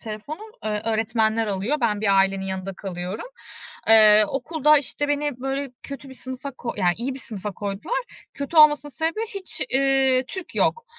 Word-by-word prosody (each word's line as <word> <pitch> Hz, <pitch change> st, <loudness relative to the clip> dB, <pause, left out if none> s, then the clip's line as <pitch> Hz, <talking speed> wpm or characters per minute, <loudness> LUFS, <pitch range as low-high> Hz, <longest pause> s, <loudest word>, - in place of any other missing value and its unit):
telefonu, 215 Hz, +8 st, -7 dB, 0.3 s
ııı, 210 Hz, -1 st, -1 dB
öğretmenler 220 Hz, 0 st, +1 dB
alıyor. 205 Hz, +9 st, -1 dB
Ben 210 Hz, -3 st, +1 dB
bir 200 Hz, -2 st, +3 dB
ailenin 195 Hz, 0 st, +2 dB
yanında 190 Hz, 0 st, -4 dB
kalıyorum. 185 Hz, -, -6 dB, 0.6 s
Eee, 215 Hz, -1 st, +8 dB
okulda, 300 Hz, +1 st, +3 dB
işte, 290 Hz, +1 st, -4 dB
beni 290 Hz, -3 st, -1 dB
böyle 270 Hz, 0 st, -3 dB
kötü 275 Hz, 0 st, -9 dB
bir 265 Hz, -, -11 dB
sınıfa 260 Hz, +2 st, -7 dB
ko 245 Hz, -2 st, -6 dB
Ya, 185 Hz, -3 st, 0 dB
iyi 255 Hz, +4 st, -2 dB
bir -, -, -8 dB
sınıfa 210 Hz, -2 st, -6 dB
koydular. 205 Hz, -, -3 dB, 0.4 s
Kötü 280 Hz, +4 st, -5 dB
olmasının 295 Hz, -1 st, +6 dB
sebebi, 325 Hz, +8 st, -2 dB
hiç, 380 Hz, -2 st, -6 dB
iii, 265 Hz, -1 st, +3 dB
Türk 375 Hz, -2 st, -7 dB
yok. 470 Hz, 0 st, +1 dB
250 Hz, 165 wpm, -23 LUFS, 210-285 Hz, 0.6 s, Eee